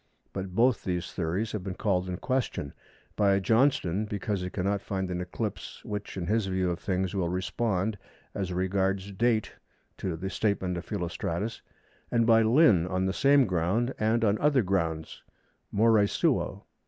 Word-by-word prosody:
But 95 -1 -5
both 120 +2 +3
these 90 -2 -3
theories 95 +5 -1
have 105 -4 -4
been 95 -1 -4
called 95 -3 0
in 90 - -3
question; 125 - -2 0.4
by 100 -2 +3
Johnston 110 -3 +2
because 105 -1 -3
he 90 - -3
cannot 100 +2 -1
find 95 -2 -3
an 90 0 -2
eclipse 100 +4 -5
which 105 -1 -5
in 90 - -2
his 105 +2 +1
view 95 -1 0
of 85 - -4
things 95 -1 -1
will 90 -4 0
respond 100 +2 -1 0.3
as 95 -2 -3
regards 95 +2 0
date 110 +2 0 0.4
to 90 -3 -2
the 95 +4 -5
statement 95 -4 0
of 85 0 -5
Philostratus, 90 +2 -3 0.5
and 115 -1 +2
by 115 -1 +6
Lynn 110 - +5
on 95 0 0
the 95 - 0
same 140 +3 +5
ground 95 +7 0
and 110 +2 +2
on 105 0 +2
other 145 -4 +3
grounds, 80 -4 -2 0.5
more 115 +3 +4 0.2
suo. - - 0
95 Hz, 165 wpm, -28 LUFS, 90-110 Hz, 0.5 s, by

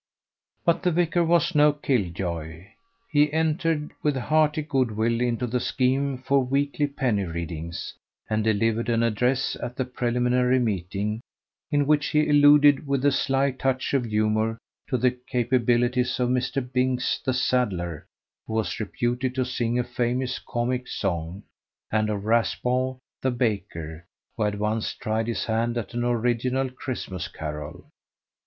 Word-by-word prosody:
But 170 - +3
the 180 - +2
vicar 170 +1 +2
was 170 +2 +2
no 150 0 +6
kill 130 -10 0
joy. 85 +1 -5 0.4
He 150 -1 +4
entered 160 -1 0
with 150 -2 +1
hearty 155 +3 +2
good 135 -5 +1
will 115 +2 +1
into 125 0 0
the 125 +1 -1
scheme 130 +2 0
for 135 +1 +2
weekly 140 +3 0
penny 125 -8 0
readings, 85 -1 -5 0.3
and 110 0 0
delivered 115 +2 +1
an 115 0 +2
address 125 +3 +1
at 120 - -5
the 130 - -1
preliminary 125 0 +1
meeting, 105 -1 -2 0.5
in 145 -2 +2
which 145 0 +2
he 150 0 +2
alluded 145 -1 +6
with 140 0 0
a 145 - +5
sly 135 +1 +1
touch 130 0 -1
of 135 -3 +2
humour 110 +1 +1 0.3
to 130 - 0
the 125 +1 +3
capabilities 125 0 +1
of 125 -1 +1
Mr. 125 +1 -1
Binks, 125 0 +1
the 130 - +1
saddler, 100 - -1 0.4
who - - -5
was 110 -1 -1
reputed 120 +4 -2
to 130 -1 +1
sing 120 -1 -1
a 125 - +2
famous 125 +1 -1
comic 125 +1 -2
song, 90 0 -3 0.5
and 110 0 +1
of 100 -1 -3
Raspall, 125 +3 +1 0.2
the 130 - +1
baker, 90 -9 -3 0.3
who - - -5
had 105 0 -1
once 105 +1 -1
tried 110 0 -2
his 115 - -2
hand 115 +1 0
at 110 -5 -4
an 120 0 -1
original 120 +2 0
Christmas 125 - -5
carol. 75 0 -7
125 Hz, 150 wpm, -25 LUFS, 110-135 Hz, 0.5 s, no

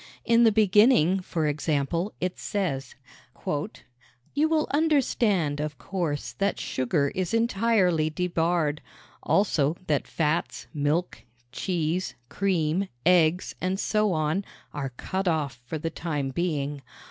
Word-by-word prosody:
In 235 0 +5
the 225 - +6
beginning, 205 -3 +5
for 170 -3 -2
example, 155 +5 0
it 180 0 -3
says: 170 -10 -2 0.5
"You 130 - -4
will 315 -1 +2
understand, 235 - +2
of 150 -1 -3
course, 165 -6 -3
that 200 0 0
sugar 140 +2 0
is 185 +3 -1
entirely 205 -8 +2
debarred. 165 -2 0 0.4
Also, 165 -6 +2
that 150 -4 0
fats, 160 +1 -1
milk, 150 +4 -1 0.3
cheese, 175 +3 -2
cream, 185 -1 0 0.2
eggs, 175 0 +3
and 185 +1 -1
so 215 -1 +1
on, 155 +3 0 0.3
are 140 -2 -3
cut 190 +10 -4
off 145 -7 -1
for 160 - -3
the 165 +2 -3
time 150 -5 -3
being. 145 -2 -2
170 Hz, 120 wpm, -26 LUFS, 150-195 Hz, 0.5 s, the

